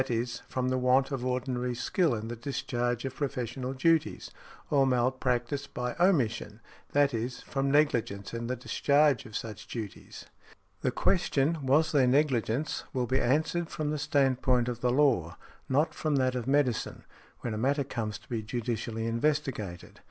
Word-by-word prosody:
e._, 120 0 -2
from 130 0 -1
the 130 0 +1
want 130 +2 +3
of 135 -3 -3
ordinary 125 -1 -1
skill 160 +2 +1
in 110 0 -5
the 120 - -4
discharge 120 -1 -2
of 135 - -3
professional 130 -2 -3
duties; 160 +4 +1 0.4
or 135 -2 +4
malpractice 130 +2 0
by 125 0 -4
omission, 120 - +1 0.4
i. 145 0 +6
e., 115 +2 -1 0.2
from 135 -1 -1
negligence 120 -10 +1
in 115 0 -3
the 125 - -1
discharge 140 +1 +2
of 110 - -11
such 110 -1 -7
duties. 110 -4 -7 0.6
The - - +1
question, 160 -4 +1
"Was 150 +5 +3
there 135 -4 +4
negligence?" 135 0 +1
will 125 -1 0
be 130 +2 +1
answered 155 +6 +1
from 150 -1 -2
the 150 - -2
stand 135 -3 +2
point 125 -2 +2
of 120 -1 -4
the 125 - +2
law, 125 - +2 0.3
not 145 +5 +2
from 155 -2 -1
that 130 -2 +2
of 125 -1 -3
medicine, 135 -4 +1 0.4
when 120 - -3
a - - -3
matter 140 +4 +1
comes 110 -6 -4
to - - -22
be 115 -3 -2
judicially 115 0 -3
investigated. 115 - -2
130 Hz, 165 wpm, -29 LUFS, 120-140 Hz, 0.6 s, i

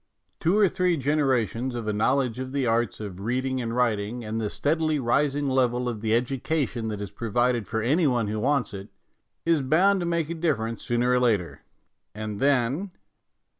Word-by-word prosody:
Two 175 +5 +2
or 210 -2 +5
three 180 -1 +1
generations 130 -4 0
of 115 -2 -4
a 105 - 0
knowledge 125 +3 +1
of 130 0 -5
the 140 -2 0
arts 115 -1 0
of 100 -4 -7
reading 130 +4 -1
and 115 -1 -3
writ 120 -4 +2
ing, 110 +4 -5
and 110 +1 -3
the 105 - -1
steadily 155 +3 0
rising 140 +3 +1
level 125 -2 +1
of 115 -4 -3
the 110 - -2
edu 120 +3 0
cation 130 -8 -1
that 105 -2 -4
is 100 -2 -5
provided 120 +1 0
for 110 0 -2
any 150 +7 +3
one 120 -4 +1
who 105 +1 -2
wants 135 0 0
it, 100 +1 -8 0.6
is 165 -3 +3
bound 185 +9 +3
to 175 - -2
make 170 -2 -1
a - - -1
difference 130 -9 -1
sooner 120 +1 +1
or 125 - +4
later. 105 -8 0 0.5
And 105 -1 -5
then. 140 - +1
125 Hz, 195 wpm, -26 LUFS, 115-145 Hz, 0.6 s, or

